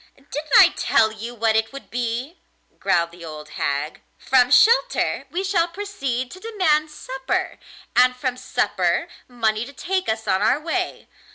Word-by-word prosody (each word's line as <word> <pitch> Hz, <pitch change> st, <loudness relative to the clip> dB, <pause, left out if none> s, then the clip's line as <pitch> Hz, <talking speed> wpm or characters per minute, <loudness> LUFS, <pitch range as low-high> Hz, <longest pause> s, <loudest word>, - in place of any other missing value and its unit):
'Didn't 290 Hz, +2 st, -8 dB
I -, -, +9 dB
tell 220 Hz, -1 st, +2 dB
you 225 Hz, +3 st, -8 dB
what 225 Hz, -1 st, +1 dB
it 220 Hz, 0 st, +1 dB
would 275 Hz, 0 st, -11 dB
be?' 245 Hz, +6 st, -3 dB, 0.4 s
growled 170 Hz, -3 st, +1 dB
the 170 Hz, 0 st, -13 dB
old 155 Hz, -2 st, -9 dB
hag. 145 Hz, +1 st, -3 dB, 0.2 s
'From 250 Hz, -1 st, +3 dB
shelter -, -, +3 dB
we 370 Hz, +2 st, -3 dB
shall 370 Hz, -3 st, +1 dB
proceed 335 Hz, -10 st, -4 dB
to 370 Hz, -, -10 dB
demand 370 Hz, -8 st, +1 dB
supper, 265 Hz, -3 st, -4 dB, 0.4 s
and 250 Hz, 0 st, +5 dB
from 250 Hz, 0 st, -2 dB
supper 255 Hz, -, 0 dB, 0.2 s
money 225 Hz, -3 st, -1 dB
to 280 Hz, +4 st, -10 dB
take 375 Hz, +6 st, -2 dB
us 220 Hz, 0 st, -2 dB
on 190 Hz, 0 st, +2 dB
our 220 Hz, +7 st, +3 dB
way. 345 Hz, +3 st, -3 dB
255 Hz, 160 wpm, -22 LUFS, 220-335 Hz, 0.4 s, I